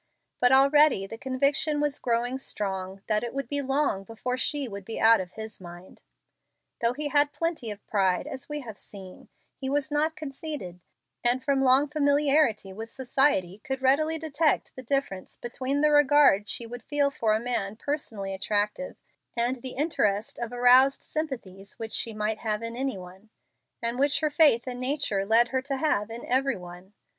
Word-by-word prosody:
But 250 Hz, 0 st, +4 dB
already 275 Hz, -4 st, +5 dB
the 225 Hz, +3 st, -9 dB
conviction 280 Hz, +4 st, +1 dB
was 295 Hz, -1 st, -1 dB
growing 245 Hz, +2 st, -1 dB
strong 195 Hz, -5 st, -5 dB
that 215 Hz, 0 st, 0 dB
it 240 Hz, +2 st, -5 dB
would 275 Hz, -3 st, -3 dB
be 285 Hz, +2 st, 0 dB
long 270 Hz, -7 st, 0 dB
before 225 Hz, +4 st, -4 dB
she 280 Hz, +1 st, -2 dB
would 200 Hz, -3 st, -8 dB
be 225 Hz, +3 st, -6 dB
out 225 Hz, -2 st, +6 dB
of 180 Hz, -1 st, -9 dB
his 220 Hz, -2 st, -8 dB
mind. 175 Hz, +1 st, -12 dB, 0.8 s
Though 235 Hz, +1 st, +2 dB
he 295 Hz, +2 st, -3 dB
had 290 Hz, 0 st, +3 dB
plenty 330 Hz, -9 st, -3 dB
of 205 Hz, -1 st, -8 dB
pride, 190 Hz, -3 st, +1 dB
as 260 Hz, -, -7 dB
we 295 Hz, 0 st, -4 dB
have 220 Hz, -5 st, -9 dB
seen, 190 Hz, -3 st, -12 dB, 0.3 s
he 265 Hz, -, -4 dB
was 285 Hz, +1 st, -1 dB
not 310 Hz, +2 st, 0 dB
conceited, 275 Hz, -, -7 dB, 0.4 s
and 245 Hz, +2 st, +2 dB
from 280 Hz, -2 st, +1 dB
long 270 Hz, +2 st, +4 dB
familiarity 285 Hz, -8 st, +2 dB
with 225 Hz, +3 st, -7 dB
society 245 Hz, -8 st, +1 dB
could 265 Hz, 0 st, -4 dB
readily 310 Hz, +5 st, +3 dB
detect 315 Hz, 0 st, 0 dB
the 260 Hz, -, -7 dB
difference 255 Hz, -7 st, -3 dB
between 260 Hz, +4 st, -2 dB
the 300 Hz, 0 st, +4 dB
regard 290 Hz, -8 st, +5 dB
she 235 Hz, -, -1 dB
would 240 Hz, +1 st, -8 dB
feel 285 Hz, +3 st, +1 dB
for 225 Hz, -6 st, +1 dB
a -, -, 0 dB
man 220 Hz, -4 st, -2 dB
personally 220 Hz, -8 st, -4 dB
attractive 210 Hz, +6 st, -2 dB, 0.4 s
and 240 Hz, +3 st, 0 dB
the 255 Hz, +1 st, -5 dB
interest 220 Hz, -8 st, -1 dB
of 235 Hz, -1 st, -4 dB
aroused 250 Hz, +2 st, +5 dB
sympathies 205 Hz, -11 st, -6 dB
which 220 Hz, -1 st, -6 dB
she 230 Hz, -, +1 dB
might 215 Hz, 0 st, -2 dB
have 215 Hz, 0 st, -2 dB
in 230 Hz, 0 st, -4 dB
any 265 Hz, -2 st, -2 dB
one, 185 Hz, +4 st, -13 dB, 0.5 s
and 235 Hz, +2 st, -2 dB
which 285 Hz, +2 st, +2 dB
her 305 Hz, -1 st, +1 dB
faith 290 Hz, -7 st, +5 dB
and 250 Hz, -1 st, -5 dB
nature 255 Hz, -8 st, -1 dB
led 230 Hz, +2 st, +4 dB
her 260 Hz, 0 st, -1 dB
to 275 Hz, 0 st, -3 dB
have 260 Hz, -8 st, 0 dB
in 230 Hz, +2 st, -7 dB
every 265 Hz, 0 st, +1 dB
one. 180 Hz, +2 st, -12 dB
250 Hz, 180 wpm, -27 LUFS, 210-285 Hz, 0.8 s, out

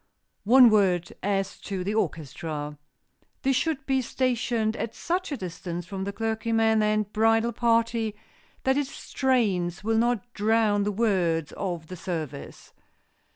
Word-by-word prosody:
One 245 Hz, +1 st, +8 dB
word 185 Hz, -5 st, +2 dB
as 195 Hz, -1 st, -1 dB
to 195 Hz, -3 st, -4 dB
the 200 Hz, +3 st, -2 dB
orchestra. 150 Hz, -5 st, -3 dB, 0.7 s
This 270 Hz, -1 st, +2 dB
should 280 Hz, 0 st, -1 dB
be 265 Hz, -1 st, +1 dB
stationed 235 Hz, -3 st, 0 dB
at 225 Hz, -, -4 dB
such 360 Hz, +1 st, -2 dB
a 285 Hz, -, -2 dB
distance 175 Hz, -2 st, -5 dB
from 190 Hz, 0 st, -5 dB
the 200 Hz, -, -2 dB
clergyman 225 Hz, 0 st, +1 dB
and 215 Hz, -1 st, 0 dB
bridal 225 Hz, +2 st, +3 dB
party 230 Hz, -1 st, +1 dB, 0.5 s
that 265 Hz, +1 st, +2 dB
its 280 Hz, -2 st, -2 dB
strains 205 Hz, -14 st, 0 dB
will 225 Hz, +1 st, +2 dB
not 240 Hz, 0 st, 0 dB
drown 210 Hz, -1 st, +2 dB
the 210 Hz, -, 0 dB
words 185 Hz, -7 st, +1 dB
of 175 Hz, -4 st, -4 dB
the 185 Hz, -, -8 dB
service. 155 Hz, -6 st, -6 dB
215 Hz, 140 wpm, -26 LUFS, 185-235 Hz, 0.7 s, One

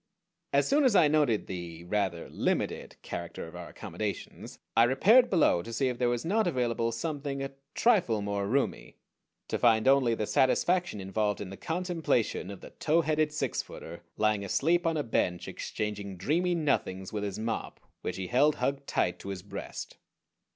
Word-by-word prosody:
As 140 Hz, 0 st, +3 dB
soon 290 Hz, +2 st, +3 dB
as 250 Hz, -6 st, +4 dB
I 160 Hz, -, +7 dB
noted 145 Hz, -8 st, +2 dB
the 85 Hz, -2 st, -7 dB
rather 95 Hz, -2 st, -1 dB
limited -, -, -1 dB
character 85 Hz, -1 st, -6 dB
of 80 Hz, -, -12 dB
our 90 Hz, -1 st, -7 dB
accommodations -, -, -6 dB, 0.2 s
I 115 Hz, -, +7 dB
repaired 210 Hz, -, +5 dB
below, 160 Hz, -, +3 dB
to 115 Hz, -, -8 dB
see 130 Hz, +3 st, +1 dB
if 125 Hz, -, -4 dB
there 125 Hz, -1 st, +2 dB
was 120 Hz, +2 st, -1 dB
not 215 Hz, +4 st, +2 dB
available 120 Hz, -6 st, 0 dB
something 140 Hz, +2 st, -3 dB
a 135 Hz, -, -4 dB, 0.2 s
trifle 175 Hz, -, +3 dB
more 100 Hz, -1 st, -1 dB
roomy: 135 Hz, +6 st, -1 dB, 0.5 s
to -, -, -2 dB
find 115 Hz, -1 st, +4 dB
only 135 Hz, -4 st, +5 dB
the 110 Hz, -, -2 dB
satisfaction 175 Hz, -, +2 dB
involved 105 Hz, +2 st, -1 dB
in 95 Hz, -2 st, -6 dB
the -, -, -6 dB
contemplation 165 Hz, -, -1 dB
of 100 Hz, -2 st, -8 dB
the -, -, -11 dB
tow 160 Hz, +2 st, +2 dB
headed 155 Hz, -1 st, +1 dB
six 150 Hz, -, -1 dB
footer 85 Hz, +1 st, -10 dB, 0.2 s
lying 105 Hz, -1 st, +2 dB
asleep 165 Hz, -, +2 dB
on 165 Hz, -1 st, +1 dB
a 150 Hz, -, 0 dB
bench 90 Hz, -7 st, -1 dB
exchanging 100 Hz, -2 st, -4 dB
dreamy 175 Hz, -, +1 dB
nothings 95 Hz, -, -1 dB
with 105 Hz, -1 st, -2 dB
his 100 Hz, -2 st, -3 dB
mop, 110 Hz, 0 st, -3 dB, 0.2 s
which 90 Hz, -, -3 dB
he 95 Hz, 0 st, -4 dB
held 135 Hz, +8 st, +3 dB
hugged 140 Hz, +2 st, -2 dB
tight 90 Hz, -, 0 dB
to 100 Hz, -, -8 dB
his 95 Hz, -2 st, -5 dB
breast. 100 Hz, -, -7 dB
120 Hz, 180 wpm, -29 LUFS, 100-155 Hz, 0.5 s, I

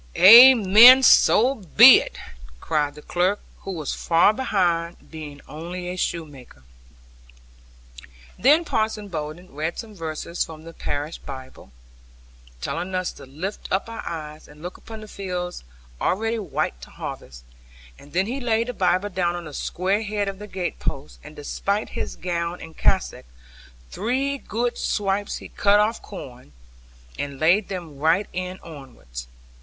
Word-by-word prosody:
'Amen! 235 Hz, +2 st, +9 dB
So 255 Hz, 0 st, +5 dB
be 230 Hz, -, +7 dB
it!' -, -, -9 dB, 0.4 s
cried 145 Hz, -, -1 dB
the 150 Hz, -, -13 dB
clerk, 185 Hz, +4 st, 0 dB, 0.2 s
who 195 Hz, -, -7 dB
was 160 Hz, -6 st, -4 dB
far 170 Hz, +5 st, +3 dB
behind, 175 Hz, -8 st, -1 dB
being 150 Hz, -3 st, -9 dB
only 175 Hz, +3 st, -7 dB
a 180 Hz, -, -4 dB
shoemaker. 145 Hz, -, -5 dB, 1.8 s
Then 305 Hz, +6 st, +4 dB
Parson 215 Hz, -5 st, -2 dB
Bowden 160 Hz, +1 st, -7 dB
read 155 Hz, +4 st, -3 dB
some 220 Hz, -2 st, -8 dB
verses 165 Hz, -1 st, -4 dB
from 155 Hz, -1 st, -11 dB
the 165 Hz, 0 st, -11 dB
parish 145 Hz, 0 st, -4 dB
Bible, 130 Hz, -, -11 dB, 0.9 s
telling 185 Hz, -, -4 dB
us 185 Hz, -1 st, -1 dB
to -, -, -14 dB
lift 170 Hz, +10 st, -6 dB
up 190 Hz, -, 0 dB
our 230 Hz, 0 st, -7 dB
eyes, 155 Hz, -2 st, -7 dB
and 150 Hz, +2 st, -16 dB
look 180 Hz, -, -6 dB
upon 220 Hz, -1 st, -11 dB
the 215 Hz, -, -10 dB
fields 180 Hz, -3 st, -5 dB, 0.4 s
already 225 Hz, +4 st, 0 dB
white 150 Hz, -, -3 dB
to -, -, -11 dB
harvest; -, -, -9 dB, 0.6 s
and 145 Hz, -, -16 dB
then 185 Hz, +2 st, +1 dB
he 250 Hz, +6 st, -4 dB
laid 230 Hz, 0 st, 0 dB
the -, -, -3 dB
Bible 185 Hz, 0 st, +1 dB
down 175 Hz, -2 st, -1 dB
on 175 Hz, -1 st, -7 dB
the 155 Hz, -, -10 dB
square 190 Hz, +8 st, -1 dB
head 210 Hz, -1 st, -2 dB
of 195 Hz, 0 st, -5 dB
the 210 Hz, -, -8 dB
gate 185 Hz, -2 st, -4 dB
post, 140 Hz, +2 st, -5 dB
and 150 Hz, 0 st, -12 dB
despite 200 Hz, +8 st, -3 dB
his -, -, -5 dB
gown 175 Hz, -1 st, -3 dB
and 160 Hz, 0 st, -11 dB
cassock, 190 Hz, -, 0 dB, 0.6 s
three 270 Hz, +5 st, -1 dB
good 240 Hz, +1 st, -3 dB
swipes 200 Hz, 0 st, -1 dB
he -, -, -10 dB
cut 205 Hz, 0 st, +3 dB
off 215 Hz, +2 st, 0 dB
corn, 125 Hz, -, -11 dB, 0.7 s
and 140 Hz, -1 st, -5 dB
laid 180 Hz, +6 st, +3 dB
them 170 Hz, -7 st, -7 dB
right 165 Hz, +7 st, +2 dB
end 185 Hz, +1 st, -5 dB
onwards. 125 Hz, -, -10 dB
180 Hz, 150 wpm, -23 LUFS, 155-210 Hz, 1.8 s, Amen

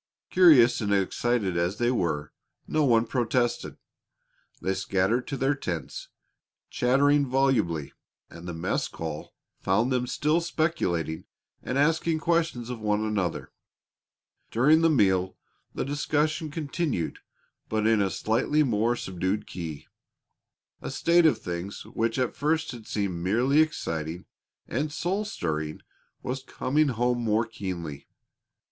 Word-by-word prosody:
Curious 150 Hz, -11 st, +6 dB
and 100 Hz, -1 st, -1 dB
excited 100 Hz, 0 st, +1 dB
as 85 Hz, +4 st, 0 dB
they 120 Hz, +1 st, +2 dB
were, 80 Hz, -10 st, -1 dB, 0.3 s
no 155 Hz, -1 st, +1 dB
one 115 Hz, -4 st, +4 dB
protested. 120 Hz, 0 st, -1 dB, 0.8 s
They 95 Hz, -, -1 dB
scattered 95 Hz, +5 st, 0 dB
to 140 Hz, -, -3 dB
their 135 Hz, +2 st, +2 dB
tents, 90 Hz, -, -5 dB, 0.6 s
chattering 140 Hz, +3 st, +3 dB
volubly, 125 Hz, -, +1 dB, 0.3 s
and 85 Hz, +1 st, -11 dB
the 90 Hz, -, -4 dB
mess 80 Hz, -, -1 dB
call 80 Hz, -2 st, -7 dB, 0.2 s
found 110 Hz, +7 st, +1 dB
them 125 Hz, -1 st, 0 dB
still 155 Hz, +6 st, +1 dB
speculating 90 Hz, -, -1 dB, 0.4 s
and 130 Hz, -, -3 dB
asking 160 Hz, +2 st, +2 dB
questions 160 Hz, -7 st, 0 dB
of 120 Hz, -, -5 dB
one 105 Hz, 0 st, 0 dB
another. 100 Hz, -5 st, -2 dB, 1.0 s
During 150 Hz, +8 st, +4 dB
the 165 Hz, -, +4 dB
meal 95 Hz, -, +2 dB, 0.4 s
the -, -, -2 dB
discussion 150 Hz, +2 st, 0 dB
continued 150 Hz, -, -2 dB, 0.5 s
but 110 Hz, -1 st, 0 dB
in 110 Hz, -1 st, +4 dB
a 100 Hz, -, +1 dB
slightly 115 Hz, +10 st, +1 dB
more 120 Hz, -2 st, +1 dB
subdued 95 Hz, -1 st, -2 dB
key. 80 Hz, -5 st, -7 dB, 1.0 s
A -, -, -5 dB
state 170 Hz, 0 st, +4 dB
of 155 Hz, -, +3 dB
things 90 Hz, +4 st, -5 dB
which 115 Hz, +1 st, -1 dB
at 130 Hz, -2 st, 0 dB
first 160 Hz, +2 st, 0 dB
had 115 Hz, -3 st, -10 dB
seemed 95 Hz, -5 st, -2 dB
merely 120 Hz, +10 st, +3 dB
exciting 85 Hz, -, -1 dB, 0.4 s
and 145 Hz, +5 st, -2 dB
soul 190 Hz, +7 st, -1 dB
stirring 80 Hz, -, -3 dB, 0.4 s
was 130 Hz, +2 st, -3 dB
coming 145 Hz, +3 st, 0 dB
home 125 Hz, -1 st, 0 dB
more 115 Hz, 0 st, +1 dB
keenly. 90 Hz, -9 st, -6 dB
120 Hz, 130 wpm, -27 LUFS, 95-145 Hz, 1.0 s, Curious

